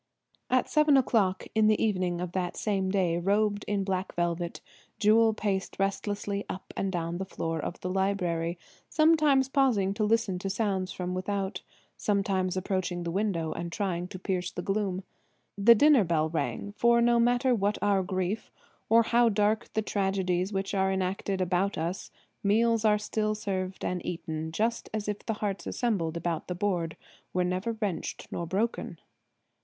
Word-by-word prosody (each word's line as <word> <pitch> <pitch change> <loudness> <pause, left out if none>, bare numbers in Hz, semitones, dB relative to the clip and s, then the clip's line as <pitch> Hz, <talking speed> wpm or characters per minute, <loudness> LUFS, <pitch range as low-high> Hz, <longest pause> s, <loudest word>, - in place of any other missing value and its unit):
At 255 0 +2
seven 300 -2 +4
o'clock 205 -8 +2
in 220 -1 +4
the 215 0 +3
evening 185 -5 0
of 180 -1 -3
that 180 -1 -2
same 195 -3 0
day, 180 -3 +1
robed 205 +3 +1
in 200 -1 0
black 190 -1 -2
velvet, 170 0 -1 0.4
Jewel 225 +1 +5
paced 195 -3 -2
restlessly 200 +1 -1
up 185 - -7
and 195 - -1
down 170 -1 -3
the - - -1
floor 165 -3 -3
of 170 - -5
the 185 - -3
library, 180 -3 0 0.3
sometimes 305 -4 +4
pausing 250 -9 +2
to 215 +1 -1
listen 215 -4 +1
to 195 - -3
sounds 195 -2 -1
from 180 0 -4
without, 195 +1 -2 0.4
sometimes 195 -3 0
approaching 185 -2 -2
the 170 - -3
window 180 -4 -1
and 170 0 -4
trying 180 -1 -2
to 185 - -8
pierce 180 -1 -2
the 175 - -6
gloom. 195 -2 -1 0.5
The 220 +4 +7
dinner 285 -1 +6
bell 160 -3 +1
rang; 170 +5 -2
for 235 +3 +3
no 235 0 +4
matter 245 +2 +3
what 205 -2 +1
our 200 -2 +2
griefs, 185 +3 -2 0.4
or 230 +1 +6
how 235 +1 +4
dark 210 +1 +1
the 220 - 0
tragedies 190 -2 0
which 195 0 -2
are 190 -1 +2
enacted 190 +1 -1
about 185 +2 0
us, 170 +4 -3 0.3
meals 225 +2 +3
are 210 -1 +4
still 215 0 -1
served 190 -3 -3
and 180 -1 -2
eaten, 160 -2 -4
just 225 +7 -1
as 210 -1 -3
if 210 -1 -3
the 225 - -1
hearts 200 -1 -3
assembled 180 -10 -1
about 170 -1 -2
the 180 - -3
board 175 -4 -1 0.4
were 180 - +2
never 185 +5 -1
wrenched 200 -7 -3
nor 170 - -3
broken. 205 +7 -2
195 Hz, 170 wpm, -28 LUFS, 180-215 Hz, 0.5 s, The